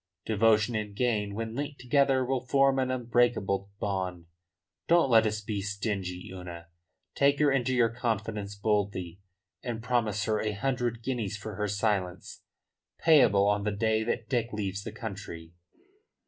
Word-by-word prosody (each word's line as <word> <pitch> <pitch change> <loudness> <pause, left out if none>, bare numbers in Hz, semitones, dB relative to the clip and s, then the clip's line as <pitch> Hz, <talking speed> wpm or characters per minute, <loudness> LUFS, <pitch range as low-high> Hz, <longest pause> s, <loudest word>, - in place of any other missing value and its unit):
Devotion 110 +1 +3
and 105 -2 -3
gain 105 -4 0
when 110 0 -4
linked 145 +2 -4
together 135 0 +2
will 130 0 -2
form 135 0 +3
an 130 -1 0
unbreakable 120 -5 +1
bond. 95 -4 -3 0.6
Don't 165 -6 +4
let 110 -1 +6
us 105 0 -2
be 105 -1 -3
stingy, 100 -3 -3
Una. 85 -2 -9 0.4
Take 140 0 +3
her 150 -1 +3
into 130 -1 +1
your 120 -2 +4
confidence 110 -3 -3
boldly, 100 -4 -1 0.4
and 115 -2 -5
promise 110 -4 0
her 110 0 0
a 105 -1 -1
hundred 120 0 -2
guineas 115 -6 -2
for 105 +1 -7
her 105 +1 -2
silence 100 -3 -2 0.6
payable 115 -11 +5
on 105 0 +2
the 105 - 0
day 110 +2 +1
that 115 0 -2
Dick 120 -2 -1
leaves 100 -2 -3
the 110 - -6
country." 95 -7 -8
110 Hz, 150 wpm, -29 LUFS, 100-120 Hz, 0.6 s, let